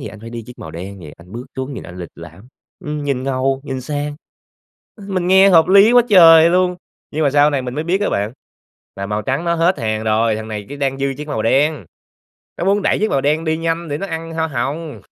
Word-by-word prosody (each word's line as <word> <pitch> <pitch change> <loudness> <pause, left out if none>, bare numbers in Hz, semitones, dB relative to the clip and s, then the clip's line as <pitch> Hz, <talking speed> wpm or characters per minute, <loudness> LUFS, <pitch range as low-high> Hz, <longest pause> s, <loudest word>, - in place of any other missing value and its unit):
thì - - -7
anh 110 - -12
phải 115 +1 -10
đi 120 -1 -6
chiếc 125 - -13
màu 80 - -8
đen 95 +5 -8
vậy, 75 -3 -11
anh 90 +2 -17
bước 120 +2 -7
xuống, 130 +1 -4
nhìn - - -7
anh 90 - -11
lịch 85 - -7
lãm. 85 +8 -13 0.4
Ừm, 150 -1 -4
nhìn 135 -3 -1
ngầu, 135 0 -1
nhìn 135 -2 -4
sang." 145 +2 -4 0.9
Mình 185 -3 -2
nghe 190 +1 +6
hợp 165 -2 +5
lý 200 +4 +6
quá 245 - +7
trời 165 -4 +8
luôn, 180 0 +2 0.4
nhưng 155 +1 -1
mà 140 - +2
sau 145 +1 +4
này 140 -3 -1
mình 125 0 -6
mới 150 - -3
biết 180 +4 0
á - - +1
bạn, 105 +3 -1 0.6
là 100 - -5
màu 105 +1 -2
trắng 135 +7 -2
nó 170 - +1
hết 165 -1 +1
hàng 110 -1 -2
rồi. 110 0 +1
Thằng 110 0 -6
này 105 -2 -6
chỉ 145 - -7
đang 135 -1 -1
dư 140 0 -1
chiếc 150 - -7
màu 110 -7 -2
đen, 135 - +1 0.7
nó 175 - -3
muốn 200 +1 +2
đẩy - - +1
chiếc 215 - +1
màu 135 - +1
đen 150 +3 +1
đi 160 0 0
nhanh 165 +1 -2
để 145 - -2
nó 195 - -4
ăn 165 -1 -6
hoa 160 0 -1
hồng. 150 +4 -4
145 Hz, 255 wpm, -18 LUFS, 115-165 Hz, 0.9 s, trời